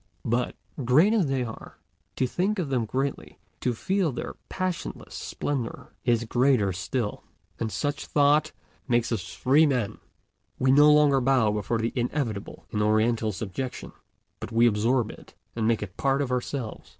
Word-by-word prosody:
But, 120 +2 0 0.3
great 155 - +5
as 205 -9 +2
they 135 -2 0
are, 115 -2 -9 0.4
to 130 - +1
think 190 +11 0
of 170 -7 -2
them 125 -4 0
greatly, 135 +5 -3 0.2
to 125 -2 -1
feel 190 - 0
their 120 - -5 0.2
passionless 185 -2 -4
splendor, 135 -5 -4
is 120 -2 +2
greater 120 -4 +2
still. 105 +5 -3 0.4
And 110 -1 -2
such 145 +8 -2
thought 150 +1 +3 0.4
makes 120 -2 +1
us 100 -7 -3
free 145 +5 +4
men; 125 -7 -1 0.6
we 130 0 +3
no 145 +2 +7
longer 145 -3 +5
bow 125 -4 +3
before 105 +2 -1
the 115 +1 -1
inevitable 120 -5 -3
in 105 - -1
Oriental 110 +1 +2
subjection, 110 +6 -5 0.5
but - - -7
we 115 +1 +4
absorb 115 +2 +2
it, - - -15 0.2
and 110 -1 0
make 115 -2 +1
it 100 - -7
a - - -12
part 135 +1 +2
of 130 - -4
ourselves. 125 -2 -3
125 Hz, 160 wpm, -26 LUFS, 110-140 Hz, 0.6 s, no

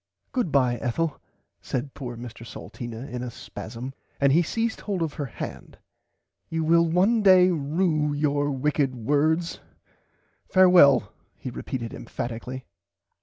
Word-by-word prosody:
Goodbye 140 - +2
Ethel 145 +6 -2 0.4
said 130 +2 -4
poor 120 -4 -6
Mr 120 -1 -9
Salteena 115 +2 -8
in 125 -3 -5
a 125 - -4
spasam 120 +2 -8 0.3
and 140 -1 +4
he 165 - +5
seized 225 +6 -2
hold 195 -5 -2
of 155 -3 -3
her 145 - -4
hand - - -8 0.7
you 160 0 -1
will 170 +1 +4
one 195 +7 +3
day 185 -2 +6
rue 155 0 +1
your 145 0 +1
wicked 140 -1 0
words 150 +8 +1 0.9
farewell 175 - +6 0.2
he 130 - -6
repeated 115 -1 -5
emphatically. 125 +1 -6
145 Hz, 125 wpm, -25 LUFS, 125-170 Hz, 0.9 s, day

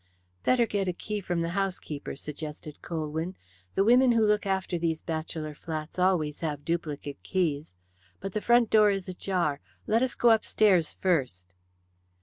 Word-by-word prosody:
"Better 245 -2 +4
get 205 -3 -1
a 180 - 0
key 210 +4 -4
from 175 -2 -1
the 165 - -1
housekeeper," 185 -5 -3
suggested 150 +1 -7
Colwyn. 160 +2 -3 0.4
"The 195 - +4
women 245 +3 +5
who 225 -1 +4
look 210 -1 +2
after 190 -2 -1
these 165 -1 -1
bachelor 160 -1 -4
flats 155 +2 -6
always 175 -5 +2
have 150 -3 -4
duplicate 150 -4 -3
keys. 155 - -1 0.4
But 195 0 -5
the 215 - -1
front 240 0 +4
door 215 -1 +6
is 195 -2 -1
ajar. 180 -5 -1 0.3
Let 225 +2 +2
us 260 -1 0
go 240 - +5
upstairs 205 -6 +3
first." 125 - -1
175 Hz, 155 wpm, -28 LUFS, 155-205 Hz, 0.4 s, door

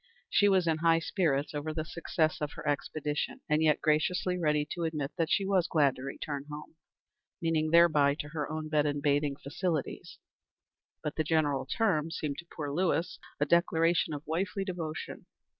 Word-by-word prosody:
She 205 - +5
was 190 -2 +3
in 160 -1 +1
high 165 0 +4
spirits 155 -4 0
over 150 +1 -4
the 155 -1 -2
success 160 -2 -1
of 150 -1 -2
her - - -8
expedition, 150 - -2
and 150 0 +2
yet 155 -2 +3
graciously 175 +4 +1
ready 150 -4 +1
to 175 - -4
admit 155 -3 -2
that 165 -3 0
she 200 - +2
was 190 -3 +2
glad 145 -6 +3
to - - -10
return 140 +1 -5
home 150 0 -8 0.7
meaning 160 -2 +1
thereby, 155 -4 +5
to 150 0 -6
her 150 -2 -3
own 155 0 -4
bed 150 -1 +2
and 145 -1 -2
bathing 145 -1 +2
facilities; 155 +2 -3 0.9
but 150 - -4
the 155 - +2
general 145 -4 +1
term 165 - +1
seemed 150 -3 -4
to 170 - -10
poor 145 -3 -4
Lewis 175 0 0 0.2
a 145 - +3
declaration 165 +1 +2
of 145 - -8
wifely 185 +4 -1
devotion. 165 -5 -5
155 Hz, 175 wpm, -30 LUFS, 150-170 Hz, 0.9 s, She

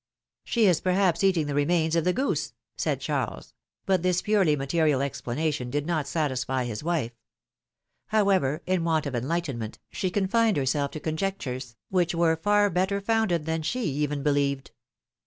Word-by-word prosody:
^^She 235 - +2
is 180 -6 +4
perhaps 185 -1 +2
eating 185 -5 +3
the 145 - -3
remains 160 +3 +2
of 165 - +1
the 180 - +4
goose 265 +9 -1 0.2
said - - -1
Charles; - - -3 0.3
but 190 -3 +2
this 180 0 +1
purely 195 -8 +3
material 145 +1 +1
explanation 140 0 -2
did 145 +3 -2
not 155 -4 -1
satisfy 130 -4 -1
his 120 +2 -5
wife. 160 -8 -1 1.0
However, 190 -8 +2
in 185 -2 0
want 160 -2 +1
of 140 - -3
enlightenment, 130 -3 -3
she 185 - -1
confined 205 +2 +2
herself 140 +1 0
to 155 - -7
conjectures, 150 -8 -3
which 175 -2 +1
were 165 -1 +3
far 205 +4 +2
better 190 +3 +1
founded 200 -6 +1
than 160 0 -1
she 245 +11 -2
even 145 -3 -1
believed. 140 -2 0
160 Hz, 155 wpm, -26 LUFS, 140-185 Hz, 1.0 s, is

